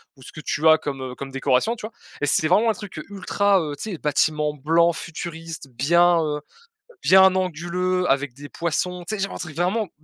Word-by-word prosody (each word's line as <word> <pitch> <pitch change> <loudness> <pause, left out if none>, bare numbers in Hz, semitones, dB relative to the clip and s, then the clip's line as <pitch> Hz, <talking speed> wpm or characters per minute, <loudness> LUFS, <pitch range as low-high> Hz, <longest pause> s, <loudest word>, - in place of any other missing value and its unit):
ou 135 - -20
ce 130 - -11
que 155 - -9
tu 155 +1 0
as, 160 - +7
comme, 140 -3 -5
heu, 130 -1 -6
comme 135 0 -7
décoration, 135 - +1
tu 215 -2 -7
vois? 230 - -17 0.3
Et 145 - +1
c'était 155 +2 +2
vraiment 215 +5 +4
un 220 - +3
truc, 200 -7 -8
heu, - - -8
ultra, 200 0 +1
heu, 150 -2 -4
tu 205 +7 -5
sais, - - -5
bâtiment 150 0 +1
blanc 165 +4 +2
futuriste, 165 -3 -7
bien, 170 +7 +3
heu, 150 -1 -2 0.6
bien 190 0 +6
anguleux, 180 +1 -1
avec 140 -2 0
des 145 +2 -11
poissons. 175 +2 -2
Tu 215 - -1
sais, 195 - -3
genre 195 - -3
un - - -6
truc 160 -3 -7
vraiment 195 +5 0
d - - -26
165 Hz, 225 wpm, -23 LUFS, 145-185 Hz, 0.6 s, as